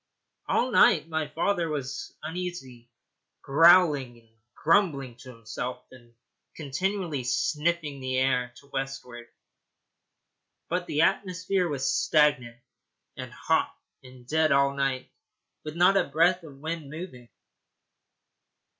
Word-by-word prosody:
All 255 Hz, -, +1 dB
night 165 Hz, -7 st, +5 dB
my 160 Hz, -1 st, -2 dB
father 170 Hz, +2 st, -1 dB
was 140 Hz, -3 st, -5 dB
uneasy, 155 Hz, -8 st, -6 dB, 0.5 s
growling 150 Hz, -5 st, +5 dB
and 115 Hz, -1 st, -23 dB, 0.3 s
grumbling 150 Hz, -, +1 dB
to 130 Hz, 0 st, -13 dB
himself 125 Hz, +1 st, -7 dB
and 120 Hz, -2 st, -18 dB, 0.4 s
continually 160 Hz, 0 st, -3 dB
sniffing 150 Hz, +3 st, -1 dB
the 130 Hz, 0 st, -2 dB
air 125 Hz, -2 st, +1 dB
to 140 Hz, -, -17 dB
westward; 135 Hz, -3 st, -5 dB, 1.4 s
but 175 Hz, +1 st, -2 dB
the 150 Hz, +2 st, +1 dB
atmosphere 185 Hz, 0 st, 0 dB
was 135 Hz, -3 st, -2 dB
stagnant 145 Hz, -6 st, +2 dB, 0.6 s
and -, -, -8 dB
hot -, -, 0 dB, 0.3 s
and 130 Hz, -1 st, -15 dB
dead 155 Hz, +3 st, +1 dB
all 140 Hz, 0 st, +3 dB
night, 135 Hz, -2 st, -2 dB, 0.5 s
with 155 Hz, 0 st, -7 dB
not 180 Hz, +3 st, +4 dB
a 190 Hz, -, +3 dB
breath 175 Hz, +5 st, +3 dB
of 145 Hz, -5 st, -13 dB
wind 160 Hz, 0 st, -5 dB
moving. 145 Hz, -7 st, -9 dB
145 Hz, 115 wpm, -27 LUFS, 130-170 Hz, 1.4 s, night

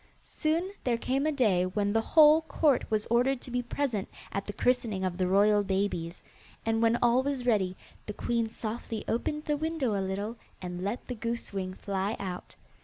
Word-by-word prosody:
Soon 330 Hz, +4 st, -1 dB
there 240 Hz, -2 st, +1 dB
came 270 Hz, +5 st, 0 dB
a -, -, +2 dB
day 215 Hz, -11 st, +3 dB
when 200 Hz, +2 st, 0 dB
the 225 Hz, -, +3 dB
whole 310 Hz, +4 st, +6 dB
court 310 Hz, -4 st, +1 dB
was 215 Hz, -1 st, +1 dB
ordered 250 Hz, +2 st, +3 dB
to 250 Hz, -, -9 dB
be 245 Hz, 0 st, 0 dB
present 245 Hz, -4 st, -2 dB, 0.2 s
at 200 Hz, -, -3 dB
the 205 Hz, -, -4 dB
christening 230 Hz, -6 st, +1 dB
of 180 Hz, -2 st, -1 dB
the 185 Hz, 0 st, 0 dB
royal 205 Hz, +2 st, +4 dB
babies, 190 Hz, -3 st, -2 dB, 0.4 s
and 225 Hz, 0 st, +1 dB
when 230 Hz, +1 st, +4 dB
all 240 Hz, +1 st, +5 dB
was 270 Hz, -2 st, -2 dB
ready 195 Hz, -6 st, +1 dB, 0.3 s
the 210 Hz, -, -4 dB
queen 230 Hz, +1 st, -1 dB
softly 220 Hz, 0 st, -5 dB
opened 300 Hz, +6 st, -1 dB
the 295 Hz, -1 st, 0 dB
window 310 Hz, -6 st, -1 dB
a 200 Hz, -, 0 dB
little, 200 Hz, +4 st, -3 dB, 0.2 s
and 180 Hz, 0 st, -5 dB
let 205 Hz, +5 st, -3 dB
the 250 Hz, -, -4 dB
goose 235 Hz, -1 st, -4 dB
wing 185 Hz, -1 st, -3 dB
fly 195 Hz, +2 st, -2 dB
out. 185 Hz, -2 st, -6 dB
225 Hz, 190 wpm, -29 LUFS, 195-255 Hz, 0.4 s, whole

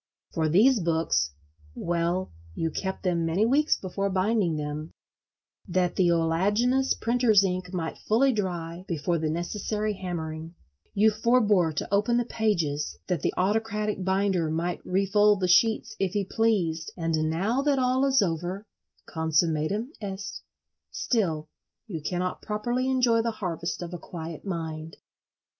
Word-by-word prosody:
For 160 Hz, -1 st, +1 dB
these 225 Hz, -, +5 dB
books—well, 160 Hz, -, -2 dB, 0.2 s
you 165 Hz, 0 st, -1 dB
kept 190 Hz, +3 st, -4 dB
them 175 Hz, -3 st, +1 dB
many 165 Hz, +6 st, +2 dB
weeks 290 Hz, +6 st, +3 dB
before 195 Hz, +1 st, -2 dB
binding 190 Hz, -2 st, +1 dB
them, 150 Hz, +1 st, -4 dB, 0.8 s
that 180 Hz, -1 st, 0 dB
the 180 Hz, -2 st, +3 dB
oleaginous 205 Hz, +11 st, +2 dB
printer's 230 Hz, -3 st, +3 dB
ink 180 Hz, -1 st, -2 dB
might 170 Hz, -3 st, -4 dB
fully 255 Hz, +5 st, +3 dB
dry 175 Hz, -4 st, -3 dB
before 170 Hz, -1 st, -1 dB
the 155 Hz, 0 st, -1 dB
necessary 210 Hz, +6 st, -2 dB
hammering; 165 Hz, -3 st, -5 dB, 0.4 s
you 215 Hz, +2 st, +5 dB
forbore 215 Hz, -6 st, +3 dB
to 190 Hz, -, -3 dB
open 210 Hz, +4 st, +3 dB
the 240 Hz, -, +1 dB
pages, 170 Hz, -11 st, -1 dB
that 180 Hz, -6 st, -1 dB
the -, -, +1 dB
autocratic 210 Hz, 0 st, 0 dB
binder 190 Hz, -3 st, +1 dB
might 170 Hz, +2 st, -2 dB
refold 200 Hz, +2 st, +3 dB
the 185 Hz, -, +1 dB
sheets 220 Hz, +5 st, +3 dB
if 190 Hz, -1 st, 0 dB
he 205 Hz, -2 st, 0 dB
pleased; 180 Hz, -8 st, 0 dB
and 160 Hz, -2 st, 0 dB
now 200 Hz, +11 st, 0 dB
that 285 Hz, -1 st, +2 dB
all 255 Hz, +1 st, +2 dB
is 270 Hz, -5 st, +4 dB
over—consummatum 170 Hz, -, -2 dB
est—still 195 Hz, -3 st, -4 dB, 0.4 s
you 175 Hz, -9 st, -5 dB
cannot 180 Hz, +3 st, -2 dB
properly 240 Hz, +5 st, -1 dB
enjoy 245 Hz, -3 st, +3 dB
the 230 Hz, -, 0 dB
harvest 175 Hz, -6 st, -4 dB
of 175 Hz, +1 st, -7 dB
a 175 Hz, -, -5 dB
quiet 165 Hz, 0 st, -8 dB
mind. 160 Hz, -3 st, -5 dB
185 Hz, 135 wpm, -27 LUFS, 165-215 Hz, 0.8 s, these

